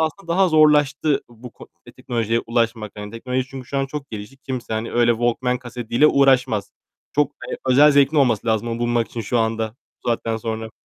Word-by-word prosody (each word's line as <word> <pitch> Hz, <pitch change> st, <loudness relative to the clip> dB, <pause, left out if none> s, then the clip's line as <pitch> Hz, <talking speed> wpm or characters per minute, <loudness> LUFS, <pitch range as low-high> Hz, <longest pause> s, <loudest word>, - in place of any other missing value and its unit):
aslında 160 Hz, +3 st, -2 dB
daha 190 Hz, +1 st, +3 dB
zorlaştı 150 Hz, -2 st, +3 dB
bu 120 Hz, +1 st, -12 dB
ko -, -, -14 dB, 0.3 s
teknolojiye 115 Hz, -1 st, -1 dB
ulaşmak. 115 Hz, -2 st, -1 dB
Hani 105 Hz, 0 st, -7 dB
teknoloji 125 Hz, +3 st, -3 dB
çünkü 130 Hz, -2 st, -8 dB
şu 140 Hz, -, -2 dB
an 135 Hz, -, 0 dB
çok 140 Hz, 0 st, -7 dB
gelişti. 105 Hz, +4 st, -8 dB
Kimse 130 Hz, -3 st, -6 dB
hani 110 Hz, +1 st, -3 dB
öyle 120 Hz, 0 st, +3 dB
Walkman 120 Hz, +2 st, 0 dB
kasetiyle 120 Hz, +2 st, 0 dB
uğraşmaz. 130 Hz, -7 st, +3 dB, 0.4 s
Çok, 145 Hz, 0 st, +1 dB, 0.2 s
eee, -, -, -4 dB
özel 145 Hz, +4 st, +6 dB
zevkin 140 Hz, +2 st, +3 dB
olması 120 Hz, -6 st, +2 dB
lazım 110 Hz, +1 st, 0 dB
onu 115 Hz, 0 st, -3 dB
bulmak 120 Hz, -1 st, 0 dB
için 115 Hz, -, -6 dB
şu 115 Hz, +3 st, -1 dB
anda, 110 Hz, 0 st, -1 dB, 0.3 s
bu -, -, -3 dB
saatten 115 Hz, -1 st, -1 dB
sonra. 110 Hz, 0 st, -5 dB
120 Hz, 190 wpm, -21 LUFS, 115-135 Hz, 0.4 s, özel